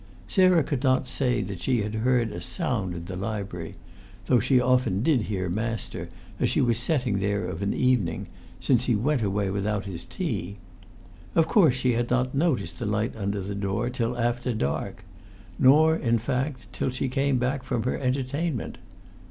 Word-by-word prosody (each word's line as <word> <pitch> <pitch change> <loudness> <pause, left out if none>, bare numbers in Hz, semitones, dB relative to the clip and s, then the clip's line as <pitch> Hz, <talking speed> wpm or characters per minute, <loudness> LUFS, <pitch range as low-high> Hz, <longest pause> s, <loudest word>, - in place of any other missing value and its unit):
Sarah 185 -4 +4
could 140 -2 -2
not 130 -1 +2
say 125 -2 0
that 95 -2 -6
she 120 +1 +1
had 105 +1 -4
heard 115 0 +1
a 85 - -6
sound 95 0 -2
in 85 0 -6
the 90 +1 -6
lib'ry 100 -4 -4 0.5
though 125 - +4
she 130 +3 +3
often 125 -5 +2
did 140 -5 +3
hear 95 -3 -2
master, 110 +5 -3 0.3
as - - +2
she - - +1
was 115 -2 +2
setting 125 -6 +1
there 100 -1 0
of 90 0 -5
a 100 - 0
evening 120 -11 +1 0.3
since 125 -2 +2
he 120 - +2
went 130 +5 +1
away 100 -1 0
without 100 +1 -1
his 95 -4 -6
tea. 95 +4 -4 0.8
Of 165 - +5
course 160 - +5
she 125 -1 +1
had 120 +1 -1
not 125 0 +1
noticed 135 - 0
the - - -2
light 110 +2 -1
under 100 -1 -2
the 100 +2 -4
door 100 +5 -1
till 120 -1 -2
after 120 0 0
dark; 70 -9 -3 0.5
not, 155 +5 +6
in 115 -1 +2
fact, 125 +4 -3
till - - -1
she 130 +1 -2
came 135 +1 +1
back 130 +2 0
from 120 -3 -2
her 125 - -1
entertainment. 135 +2 -2
120 Hz, 180 wpm, -26 LUFS, 100-130 Hz, 0.8 s, not